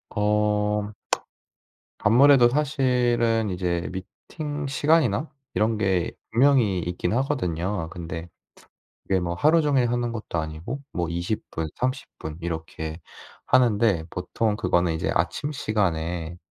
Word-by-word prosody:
어 105 0 +1 1.1
아무래도 125 +3 +6
사실은 125 -5 +1
이제 90 -2 -1
미팅 145 - -6
시간이나 145 -3 +2 0.2
이런 110 +1 +1
게 95 -4 +1 0.2
분명히 120 -5 +4
있긴 90 +2 -2
하거든요. 95 - -1
근데 85 -1 -6 0.8
이게 95 -1 +2
뭐 85 -1 -2
하루종일 145 - +3
하는 120 -1 0
것도 110 -7 -3
아니고 80 - -5
뭐 85 -2 -1
20 85 +5 -3
분, 80 0 -2
30 130 +1 -2
분 80 0 -6
이렇게 80 -1 -5 0.5
하는데 110 -8 +3
보통 105 +4 -1
그거는 85 -4 +1
이제 80 - -1
아침 90 - 0
시간에 85 - -1
105 Hz, 235 characters per minute, -25 LUFS, 85-125 Hz, 1.1 s, 아무래도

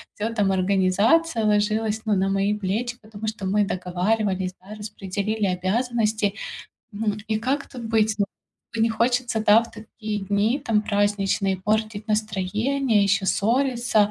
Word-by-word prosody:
всё, 220 +2 -2
там, 205 -4 +2
организация 200 - +2
ложилась, 215 +1 +1
ну, 215 -2 +2
на 195 +1 +1
мои 195 +1 +1
плечи, 220 +5 -2
потому 215 0 -8
что 215 -3 -4
мы 205 +2 +2
договаривались, 185 +1 -1
да, 200 +3 -10
распределили 210 0 -3
обязанности. 215 +2 0 0.6
Ну 210 0 -1
и 215 -1 +1
как 270 +5 -1
тут 245 -2 -9
быть? 220 -1 +2
Ну, 200 - +3 0.6
не 230 - +4
хочется 235 0 +1
в - - -4 0.3
такие 215 -1 -6
дни, 205 +6 +1
там, 220 -6 +2
праздничные, 200 -2 +1
портить 215 +1 -1
настроение, 215 +3 +1
ещё 200 0 +1
ссориться. 235 -2 +2
215 Hz, 135 wpm, -24 LUFS, 200-225 Hz, 0.6 s, не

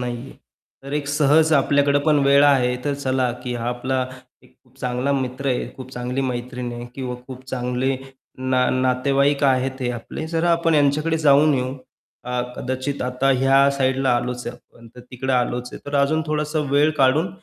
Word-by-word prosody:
नाहीये, 125 +1 -5 0.5
तर 140 - -7
एक 145 -1 -2
सहज 150 +2 +3
आपल्याकडे 140 0 +3
पण 150 -2 +4
वेळ 140 +1 +6
आहे, 125 -3 +3
तर 145 -1 0
चला 130 -2 0
की 125 - -3
हा 120 0 -3
आपला 130 +1 -1 0.4
एक 125 - -23
खूप 130 +1 -27
चांगला 125 +2 -1
मित्र 130 0 -3
आहे, 125 - -1
खूप 130 -1 -9
चांगली 125 +2 -3
मैत्रीण 125 -1 -4
आहे 120 0 -7
किंवा 130 -2 -4
खूप 130 -1 -9
चांगले 125 +1 -1 0.5
ना 125 -1 +3
नातेवाईक 135 +3 +1
आहेत 130 0 +1
हे 125 - 0
आपले, 120 +6 -6
जरा 165 +1 +1
आपण 165 -1 +2
ह्यांच्याकडे 150 +3 +2
जाऊन 150 0 +5
येऊ. 130 0 -2 0.5
अ, 125 0 -2 0.2
कदाचित 130 +2 -3
आता 125 +2 -1
ह्या 135 +1 +4
साईडला 130 0 +1
आलोच 125 0 -4
आहे 120 - -5
आपण, 115 - -19
तर - - -9
तिकडं 130 +1 -3
आलोच 125 0 -1
आहे, - - -9
तर 145 - -5
अजून 155 +3 +1
थोडासा 150 0 -1
वेळ 145 +2 +4
काढून 140 +6 +3
130 Hz, 180 wpm, -22 LUFS, 125-145 Hz, 0.5 s, वेळ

